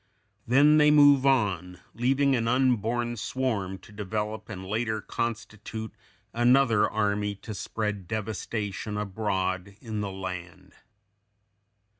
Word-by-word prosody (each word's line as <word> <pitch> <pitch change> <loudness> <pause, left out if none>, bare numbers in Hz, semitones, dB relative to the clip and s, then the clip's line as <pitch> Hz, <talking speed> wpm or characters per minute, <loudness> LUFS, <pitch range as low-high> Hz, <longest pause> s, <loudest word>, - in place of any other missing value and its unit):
Then 145 +5 +6
they 150 0 +6
move 145 -2 +6
on, 95 -9 +1
leaving 135 +3 +2
an 115 -2 0
unborn 120 -1 +1
swarm 105 -6 -2
to 95 - -17
develop 105 +1 -4
and 95 -3 -7
later 110 +2 -1
constitute 110 0 -5 0.4
another 120 -2 +4
army 105 -1 0
to 110 +2 -8
spread 105 -2 -4
devastation 105 -1 -4
abroad 95 -2 -2
in 110 -4 -4
the 100 -1 -3
land. 90 -2 -7
110 Hz, 110 wpm, -27 LUFS, 100-120 Hz, 0.4 s, Then